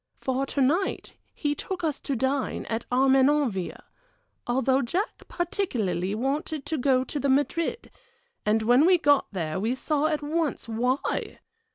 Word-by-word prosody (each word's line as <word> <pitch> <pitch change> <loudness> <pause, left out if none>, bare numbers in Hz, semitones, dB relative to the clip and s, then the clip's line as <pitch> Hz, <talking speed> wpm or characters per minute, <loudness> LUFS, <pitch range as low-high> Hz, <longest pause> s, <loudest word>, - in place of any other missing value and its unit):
For 265 +1 -1
to 280 - -1
night 330 +9 0 0.2
he 290 -1 -1
took 365 +5 -5
us 305 -4 -1
to 275 - -3
dine 265 +2 -1
at 225 0 -3
Armenonville 265 -5 +2 0.6
although 260 +2 +2
Jack 365 - -3
particularly 220 - -1
wanted 280 +5 -2
to 310 0 -2
go 255 0 +3
to 290 - -4
the 280 - 0
Madrid 305 - 0 0.5
and 215 +1 +2
when 245 +8 +5
we 365 -1 +6
got 290 -4 +3
there 170 -3 -3
we 225 +6 0
saw 300 +2 0
at 305 -2 -1
once 305 -4 -1
why! 250 +4 -1
270 Hz, 150 wpm, -26 LUFS, 245-300 Hz, 0.6 s, we